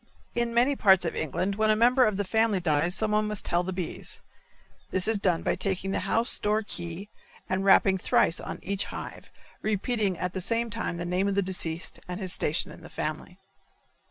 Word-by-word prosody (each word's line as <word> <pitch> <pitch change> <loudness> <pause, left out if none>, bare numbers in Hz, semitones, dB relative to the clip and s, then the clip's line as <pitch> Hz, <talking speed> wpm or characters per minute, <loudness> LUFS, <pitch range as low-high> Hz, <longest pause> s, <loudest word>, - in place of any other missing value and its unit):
In 235 0 0
many 245 +4 +3
parts 190 -7 +5
of 165 - -2
England 185 +6 -2
when 215 0 +2
a 215 - +5
member 245 +3 +5
of 215 -3 0
the 205 - 0
family 220 0 +2
dies 170 +1 +1
someone 215 -1 +1
must 210 -1 -3
tell 175 - +1
the 185 +1 -4
bees; 180 -2 -5 0.7
this 185 +1 +1
is 220 -2 +1
done 180 -4 +1
by - - +1
taking 195 -1 -2
the - - 0
house 230 +2 +3
door 215 +1 +1
key 175 0 -7 0.4
and 185 +1 -1
rapping 195 -1 +5
thrice 165 - +2
on - - -6
each 195 +1 -2
hive, - - -8 0.3
repeating 210 -2 0
at 180 +1 -3
the 190 - -2
same 230 +4 0
time 215 -5 -3
the 170 - -4
name 180 +3 0
of 200 - 0
the 200 - +2
deceased 175 -3 -3
and 180 +1 -5
his 185 -3 +1
station 150 - 0
in - - -12
the - - -11
family. - - -5
195 Hz, 205 wpm, -27 LUFS, 180-215 Hz, 0.7 s, parts